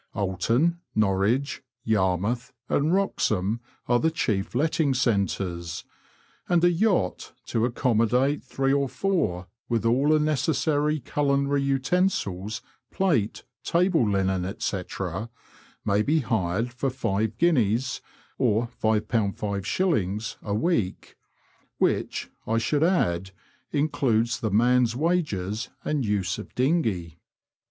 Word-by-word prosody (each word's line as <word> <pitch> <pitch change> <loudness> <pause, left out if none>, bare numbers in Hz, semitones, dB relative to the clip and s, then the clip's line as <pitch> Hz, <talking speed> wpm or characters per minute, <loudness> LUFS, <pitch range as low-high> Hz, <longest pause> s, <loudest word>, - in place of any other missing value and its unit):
Oulton, 115 - +1 0.2
Norwich, 110 +7 +1 0.2
Yarmouth, 105 +3 0 0.2
and 150 +3 +1
Wroxham 110 - +1 0.3
are 120 0 +3
the 160 - +2
chief 110 -11 -1
letting 150 0 +2
centres, 95 -8 -1 0.7
and 175 -1 +3
a 175 - +6
yacht 175 - 0
to 115 0 0
accommodate 125 +3 +1
three 135 0 0
or 140 -1 +1
four, 145 - -1 0.2
with 115 -2 0
all 125 +5 +3
necessary 150 0 +1
culinary 140 +1 +1
utensils, 135 - 0 0.3
plate, 150 - 0 0.2
table 170 - +2
linen, 95 -2 0
&c„ 95 - -1 1.0
may 100 +1 +2
be 155 +8 +2
hired 110 0 -1
for 135 +2 -1
£5 110 -4 -1 1.0
5/ 110 - 0
a 100 -1 -2
week, 110 - -1 0.6
which, - - 0 0.2
I 115 - +1
should 145 +6 +1
add, 95 - +1 0.4
includes 125 -6 +1
the 110 - -1
man's 120 +2 +3
wages 115 - -1 0.2
and 150 -3 0
use 100 -3 -1
of 105 - -10
dinghey. 110 - 0
120 Hz, 100 wpm, -26 LUFS, 100-145 Hz, 1.0 s, a